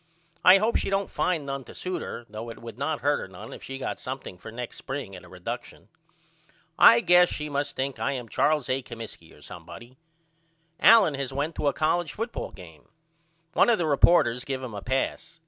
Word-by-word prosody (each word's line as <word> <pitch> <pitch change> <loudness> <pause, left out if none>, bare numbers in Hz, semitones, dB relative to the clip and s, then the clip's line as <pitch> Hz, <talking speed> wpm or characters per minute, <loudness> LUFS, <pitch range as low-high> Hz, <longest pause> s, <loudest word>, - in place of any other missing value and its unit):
I 185 +2 +9
hope 215 +4 +2
she - - -2
don't 195 0 -1
find 170 -5 0
none 135 -1 -4
to - - -12
suit 180 -3 -4
her 120 - -6
though 110 +2 -7
it 115 - -8
would 115 -2 -9
not 140 +2 -2
hurt 145 -7 0
none 105 +3 -10
if - - -10
she 135 - -7
got 135 - -4
something 130 -7 -6
for 110 - -9
next 120 +1 -7
spring 130 -8 -6
at 90 - -11
a - - -15
reduckshon. - - -7 0.9
I 120 - +8
guess 180 0 +5
she 150 0 -5
must 145 0 -2
think 135 0 -3
I 140 - 0
am 125 -3 -5
Charles 150 +4 +1
A. 130 +1 0
Comiskey 115 -9 -10
or - - -17
somebody. 120 +3 -11 0.8
Allen 215 -8 +7
has 140 -1 -4
went 145 +4 -2
to 145 - 0
a - - +3
colledge 160 0 0
football 230 +2 -4
game. 80 -5 -14 0.6
One - - +4
of 235 - +4
the 170 - 0
reporters 140 -5 +4
give 135 -1 -4
him 125 -4 -6
a 100 - -6
pass. 135 +7 -2
135 Hz, 205 wpm, -26 LUFS, 120-160 Hz, 0.9 s, I